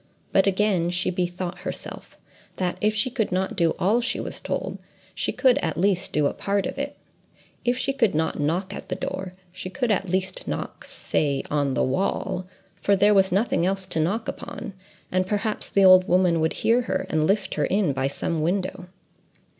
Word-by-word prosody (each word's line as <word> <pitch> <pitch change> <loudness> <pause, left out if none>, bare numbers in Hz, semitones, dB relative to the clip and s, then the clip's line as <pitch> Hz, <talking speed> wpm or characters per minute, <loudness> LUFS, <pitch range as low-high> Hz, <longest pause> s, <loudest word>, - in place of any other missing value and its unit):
But 195 - +4
again 190 -3 +2
she 180 +1 +1
bethought 180 0 -3
herself—that, 180 -1 -6
if 215 0 +2
she 250 +4 +2
could 225 -6 -1
not 185 +1 -1
do 165 -2 +2
all 215 +7 +2
she 240 - -1
was - - -4
told, - - -3 0.3
she - - -1
could, 255 -3 +3
at 160 -2 -2
least, 190 0 +2
do 150 -1 +2
a - - +1
part 200 -1 -1
of 275 - -4
it: 285 0 -4 0.7
if 245 +1 +1
she 275 +2 0
could 230 - +2
not 160 0 0
knock 175 +7 0
at - - -8
the - - -1
door, 190 -1 -4 0.2
she 185 0 -6
could 230 +5 -1
at 195 -2 0
least 185 +1 -1
knock—say 140 - -2
on 145 -2 +1
the - - +2
wall, 185 +4 -1 0.3
for 200 - +3
there 205 +2 +5
was 195 -1 +4
nothing 195 -2 +2
else 190 +1 0
to 180 -3 -2
knock 200 +9 0
upon—and 185 -1 -5
perhaps 210 +2 -2
the 195 -1 +4
old 185 0 +8
woman 180 -2 +3
would 160 0 +1
hear 230 +3 +2
her, - - -2
and 155 -1 +1
lift 200 +1 +1
her - - 0
in 190 -6 +1
by 135 0 0
some 155 +3 -2
window. 180 +2 -1
185 Hz, 185 wpm, -24 LUFS, 175-205 Hz, 0.7 s, old